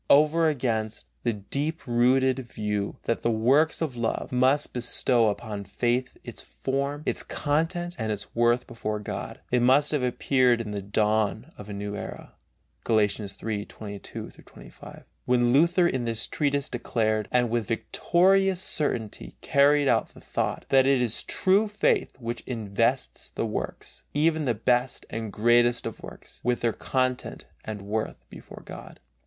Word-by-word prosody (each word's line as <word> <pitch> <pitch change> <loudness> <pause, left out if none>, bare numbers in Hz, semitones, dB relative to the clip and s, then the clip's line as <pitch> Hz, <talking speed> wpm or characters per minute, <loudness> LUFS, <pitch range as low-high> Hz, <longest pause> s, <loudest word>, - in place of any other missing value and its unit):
Over 155 +3 +5
against 115 -6 -2 0.2
the 120 - 0
deep 140 +10 -3
rooted 130 +2 +3
view 105 -1 -2
that 115 - -1
the - - +1
works 135 +9 +3
of 140 -6 -3
love 115 -1 -2
must 130 +3 +2
bestow 120 -1 +2
upon 105 -1 -5
faith 120 +6 -1
its - - -7
form, 140 +2 -3
its - - -1
content 165 +4 -1
and 110 -1 -1
its 105 - -6
worth 120 +1 +2
before 110 -3 -4
God, 105 - -6
it 125 - +3
must 135 +4 +4
have 150 -3 +1
appeared 125 -1 +2
as 105 -2 -5
the 100 - -3
dawn 110 +5 0
of 105 0 -11
a - - -5
new 100 +1 -4
era - - -8 0.5
(Galatians 105 -2 0
3:22 105 -1 -6
25) - - -13 0.2
when 120 -1 +3
Luther 170 +5 +4
in 130 -6 -1
this 115 -1 -1
treatise 140 -1 0
declared, 110 -3 -1
and 120 -2 +2
with 115 -3 0
victorious 185 - +2
certainty 120 - -1
carried 140 +1 +4
out - - +1
the - - -12
thought, - - -3
that 135 -1 +5
it 135 -1 +4
is 120 -3 +2
true 195 +3 +2
faith 205 -1 0
which 120 -2 -5
invests 115 +2 -1
the - - -1
works, 110 - -5
even 155 +1 +2
the 120 -3 +1
best 125 +3 0
and 110 -2 -4
greatest 120 +2 +3
of 115 - -6
works, - - -11
with 125 0 0
their 115 -2 +1
content 130 -1 -2 0.2
and 105 -2 -6
worth 110 +2 -4
before - - -12
God. - - -10
120 Hz, 155 wpm, -26 LUFS, 110-140 Hz, 0.5 s, Over